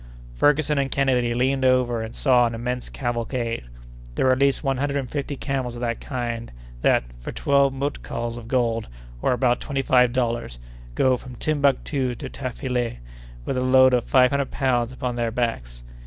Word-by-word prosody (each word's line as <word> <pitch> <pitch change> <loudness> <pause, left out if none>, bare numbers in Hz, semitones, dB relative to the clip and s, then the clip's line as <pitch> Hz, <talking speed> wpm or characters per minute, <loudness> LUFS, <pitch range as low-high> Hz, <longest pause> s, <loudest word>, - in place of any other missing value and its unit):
Ferguson 145 - +2
and 135 -1 0
Kennedy 125 -4 +1
leaned 130 +2 +1
over 125 -2 +2
and 110 0 -6
saw 125 -3 +4
an 115 - -4
immense 125 +2 -4
cavalcade. 120 - -3 0.5
There - - +1
were 130 - +5
at 130 - +2
least 140 +1 +2
one 135 -2 0
hundred 140 +1 -1
and 135 -2 -2
fifty 145 0 -4
camels 130 -3 -3
of 120 - -7
the 120 -1 0
kind 120 -2 -5 0.3
that, - - +3 0.2
for - - -6
twelve 140 -1 +2
mutkals 135 -4 -4
of 120 -1 -9
gold, 115 -3 0 0.3
or - - +2
about 125 -1 +2
twenty 135 -2 -2
five 125 -2 +4
dollars, 120 - -2 0.4
go 130 - +3
from 125 0 -11
Timbuctoo 140 -2 0
to - - -7
Tafilet 125 - -3 0.5
with 130 - -2
a - - -1
load 130 0 +6
of 125 -2 +2
five 125 -1 +4
hundred 140 -1 0
pounds 125 -3 0
upon 125 -2 -4
their 120 -1 0
backs. 60 - -3
125 Hz, 180 wpm, -23 LUFS, 120-135 Hz, 0.5 s, load